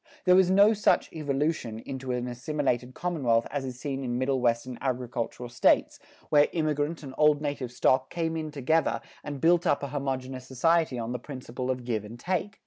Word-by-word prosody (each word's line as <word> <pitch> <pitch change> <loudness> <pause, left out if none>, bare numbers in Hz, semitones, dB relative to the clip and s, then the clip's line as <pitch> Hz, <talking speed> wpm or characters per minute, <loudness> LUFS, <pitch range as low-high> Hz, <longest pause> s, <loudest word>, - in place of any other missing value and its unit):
There 180 -1 +6
was 185 -1 +5
no 200 +3 +6
such 210 -1 +2
evolution 145 -5 -1
into 130 +2 -5
an 125 0 -2
assimilated 125 -1 -2
commonwealth 130 -10 +1
as 145 -2 -2
is 125 -1 -6
seen 135 -2 -3
in 120 -1 -2
Middle 130 0 0
Western 120 +1 0
agricultural 125 -2 -3
States, 120 +1 +2 0.3
where 145 -1 +5
immigrant 155 0 -1
and 135 -2 -8
old 150 -1 +5
native 145 -4 -3
stock 130 +1 +2
came 165 -1 -2
in 155 -1 -3
together 150 +3 +1 0.2
and 145 -2 -5
built 170 +3 +3
up 145 -2 +2
a 140 - -3
homogeneous 130 -2 -4
society 160 +1 +2
on 115 0 -3
the 125 - -3
principle 125 -1 -6
of 125 -1 -2
give 110 -4 -1
and 115 +3 -10
take. 190 +6 -2
135 Hz, 185 wpm, -28 LUFS, 125-155 Hz, 0.3 s, There